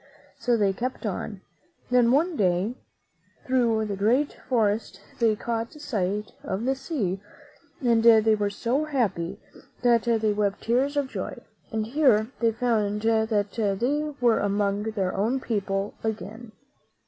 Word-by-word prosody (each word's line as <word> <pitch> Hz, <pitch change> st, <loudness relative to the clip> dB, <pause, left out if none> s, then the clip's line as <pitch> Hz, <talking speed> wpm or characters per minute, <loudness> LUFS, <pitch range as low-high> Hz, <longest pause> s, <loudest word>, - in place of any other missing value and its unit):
So 240 Hz, -1 st, +2 dB
they 200 Hz, -3 st, +2 dB
kept 250 Hz, +3 st, -4 dB
on. 205 Hz, 0 st, -4 dB, 0.5 s
Then 245 Hz, -1 st, +5 dB
one 325 Hz, +6 st, +2 dB
day, 190 Hz, +1 st, +1 dB, 0.7 s
through 235 Hz, -4 st, +2 dB
the 205 Hz, -2 st, -3 dB
great 240 Hz, +9 st, +2 dB, 0.2 s
forest 215 Hz, -5 st, 0 dB, 0.2 s
they 225 Hz, -3 st, +3 dB
caught 230 Hz, +1 st, -3 dB
sight 210 Hz, -, -2 dB
of 195 Hz, +4 st, -3 dB
the 265 Hz, -, +2 dB
sea, 260 Hz, -, -3 dB, 0.6 s
and 230 Hz, -2 st, +4 dB
they 225 Hz, -1 st, +6 dB
were 205 Hz, -1 st, 0 dB
so 240 Hz, +8 st, -1 dB
happy 225 Hz, -, -1 dB, 0.4 s
that 240 Hz, -2 st, +5 dB
they 220 Hz, -3 st, +2 dB
wept 205 Hz, -1 st, -1 dB
tears 265 Hz, +5 st, +1 dB
of 285 Hz, -2 st, +1 dB
joy; -, -, -5 dB, 0.3 s
and 220 Hz, -1 st, -1 dB
here 240 Hz, -3 st, +3 dB
they 230 Hz, -1 st, +3 dB
found 215 Hz, -3 st, 0 dB
that 220 Hz, -2 st, +1 dB
they 295 Hz, +5 st, 0 dB
were 240 Hz, -2 st, +3 dB
among 200 Hz, 0 st, 0 dB
their 200 Hz, -4 st, -1 dB
own 225 Hz, +7 st, +1 dB
people 200 Hz, -4 st, -2 dB
again. 220 Hz, +1 st, -5 dB
225 Hz, 140 wpm, -26 LUFS, 205-245 Hz, 0.7 s, they